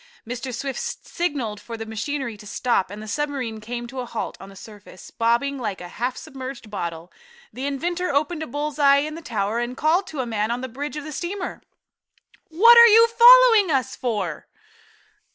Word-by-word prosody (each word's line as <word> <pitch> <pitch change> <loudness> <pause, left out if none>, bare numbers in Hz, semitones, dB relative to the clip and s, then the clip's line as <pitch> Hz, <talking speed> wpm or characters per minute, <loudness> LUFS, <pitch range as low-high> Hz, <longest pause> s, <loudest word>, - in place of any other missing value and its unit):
Mr. 250 +2 -5
Swift 265 +2 -4 0.3
signaled 265 - -3
for 230 +2 -8
the 225 - -6
machinery 230 +2 -4
to 210 0 -13
stop 225 -3 0
and 205 +2 -8
the - - -9
submarine 260 -4 -3
came 240 +2 -5
to 255 +2 -8
a 250 - -3
halt 230 - -5
on 195 - -10
the 195 - -14
surface, 200 -2 -13
bobbing 240 +5 0
about - - -8
like 210 -4 -3
a 175 - -8
half 250 +6 -3
submerged 265 -6 -8
bottle. 170 -3 -5 0.4
The 265 +2 -4
inventor 345 +6 -2
opened 300 +3 0
a 315 - -4
bull's 295 +3 -4
eye 280 0 +5
in 310 - -6
the 330 - -8
tower, 215 -5 -2
and 240 +2 -4
called 345 +5 +2
to 310 -7 -7
a - - -3
man 220 -2 -2
on 240 +1 -2
the 260 - -4
bridge 290 +5 -6
of 300 - -5
the 310 - -7
steamer: 360 +5 -5 0.9
"What 465 +9 +7
are 470 - +10
you 455 +1 +7
following 470 -4 +7
us 270 -5 0
for?" 205 - -3
260 Hz, 200 wpm, -23 LUFS, 225-305 Hz, 0.9 s, are